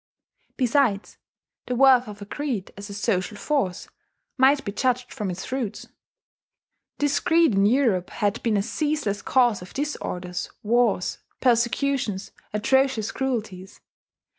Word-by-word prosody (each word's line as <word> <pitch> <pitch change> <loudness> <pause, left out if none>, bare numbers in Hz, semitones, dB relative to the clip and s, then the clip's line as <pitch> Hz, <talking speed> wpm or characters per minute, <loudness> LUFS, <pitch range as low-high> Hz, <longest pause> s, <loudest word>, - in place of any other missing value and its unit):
Besides, 250 -5 +1 0.5
the 250 - -1
worth 255 -1 +5
of 205 -1 -8
a - - -9
creed 245 -4 -4
as 200 +1 -9
a - - -7
social 205 -1 -1
force 235 -12 -1 0.5
might 275 +2 +4
be 200 - -2
judged 250 +3 -1
from 210 -6 -3
its 180 +1 -5
fruits. 255 -5 -4 1.1
This 290 -1 +1
creed 330 -6 +3
in 195 +1 +4
Europe 225 -7 +2
had 205 +2 -1
been 225 -3 +1
a 195 - +1
ceaseless 290 -7 -1
cause 240 -6 +2
of 180 - -12
disorders, 180 -11 -4
wars, 225 -4 +1 0.2
persecutions, 235 -3 +1 0.2
atrocious 260 +1 +1
cruelties. 215 -8 -4
235 Hz, 130 wpm, -24 LUFS, 200-265 Hz, 1.1 s, worth